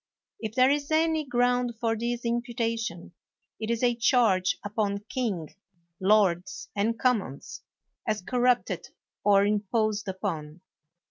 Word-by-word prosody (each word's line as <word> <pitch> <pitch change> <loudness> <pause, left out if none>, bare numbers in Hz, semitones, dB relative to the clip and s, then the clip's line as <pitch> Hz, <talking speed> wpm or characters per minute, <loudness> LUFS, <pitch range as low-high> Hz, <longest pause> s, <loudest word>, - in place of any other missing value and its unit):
If 220 -1 -5
there 255 +1 +5
is 285 0 -1
any 320 0 +2
ground 245 -2 +1
for 230 -1 +1
this 235 +1 -3
imputation, 230 -7 -2 0.5
it 220 0 -4
is 235 +1 -1
a 240 -1 +4
charge 230 -6 +3
upon 205 -1 -2
king, 200 - -2 0.5
lords 195 -2 +2
and 220 +3 0
commons, 220 - -1 0.5
as 215 -3 -1
corrupted 250 +2 +1 0.4
or 200 -1 +5
imposed 210 0 0
upon. 160 -4 -4
225 Hz, 120 wpm, -27 LUFS, 200-245 Hz, 0.5 s, there